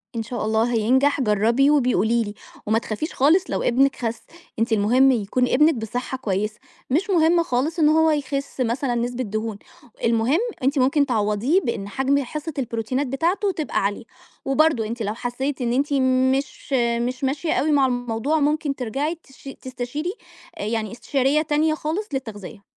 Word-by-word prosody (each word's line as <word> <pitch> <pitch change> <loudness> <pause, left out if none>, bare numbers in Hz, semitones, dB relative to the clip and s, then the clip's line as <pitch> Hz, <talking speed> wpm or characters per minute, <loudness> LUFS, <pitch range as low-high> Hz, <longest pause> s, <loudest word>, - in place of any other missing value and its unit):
إن 225 - -2
شاء 240 +1 -4
الله 220 +2 +1
هينجح، 260 +6 +2
جرّبي 230 +5 +3
وابقي 265 -4 +3
قولي 230 +3 +2
لي، 205 -1 -6 0.3
وما 220 +2 +2
تخافيش 235 - -4
خالص 315 +8 +4
لو - - -1
ابنِك 270 +3 +3
خَس، 230 -2 -4 0.4
أنتِ 230 +1 0
المهم 245 +6 +4
يكون 245 +2 0
ابنِك 300 +6 +4
بصحّة 245 +3 -4
كويسة، 210 -2 -2 0.3
مش 330 +10 +1
مهم 340 -1 +4
خالص 305 +5 -1
إن 300 -1 +5
هو 320 0 +4
يخِس 280 -2 -3
مثلًا 245 +1 0
نسبة 245 +1 -2
دهون، 215 -1 -4 0.5
المهم 230 +7 +2 0.2
أنتِ 275 +2 +2
ممكن 275 +3 +3
تعوّضيه 230 - +1
بإن 215 - -3
حجم 270 +6 +1
حصّة 305 +5 -6
البروتينات 250 +3 -2
بتاعته 350 +10 0
تبقى 315 -5 -2
عالية، 200 +4 -2 0.4
وبرضه 270 -4 +2
أنتِ 235 +1 -5
لو 210 +1 -2
حسّيتِ 255 +4 -3
إن 235 -1 0
أنتِ 285 +3 0
مش 260 +1 +1 0.3
مش 255 +2 -3
ماشية 285 +4 0
أوي 310 - +1
مع 280 -2 +4
الموضوع، 245 +4 -1
ممكن 295 -1 0
ترجعي 270 +7 -2
تش 270 0 -13
تستشيري 260 +7 -4 0.4
آآ - - -5
يعني 220 0 -2
استشارية 270 +4 +1
تانية 310 +1 +1
خالص 320 +7 -3
للتغذية. 220 -5 -6
260 Hz, 165 wpm, -23 LUFS, 230-290 Hz, 0.5 s, إن